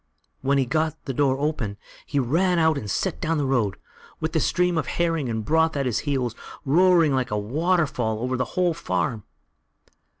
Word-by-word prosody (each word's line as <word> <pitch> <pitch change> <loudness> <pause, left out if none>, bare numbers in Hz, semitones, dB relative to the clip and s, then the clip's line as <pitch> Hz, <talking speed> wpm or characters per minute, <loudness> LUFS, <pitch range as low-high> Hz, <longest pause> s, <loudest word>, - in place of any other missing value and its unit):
When 140 +1 +2
he 135 - +2
got 155 +3 0
the 135 - -3
door 135 0 +2
open, 140 -9 -2 0.3
he 145 - -2
ran 170 +8 +2
out 160 -1 +3
and 110 -7 -5
set 190 - 0
off - - -18
down 165 -2 0
the 145 - 0
road, 120 -8 0 0.4
with 160 0 -3
the 160 - +2
stream 180 +2 +1
of 145 - -3
herrings 165 -6 0
and 110 -2 -3
broth 160 +1 +2
at 140 - 0
his 120 -3 0
heels, 125 -5 0 0.3
roaring 165 0 +4
like 130 -2 0
a 105 - -1
waterfall 135 - 0
over 125 +3 -2
the 125 - 0
whole 180 -2 +3
farm. 95 - -2
140 Hz, 195 wpm, -24 LUFS, 125-160 Hz, 0.4 s, roaring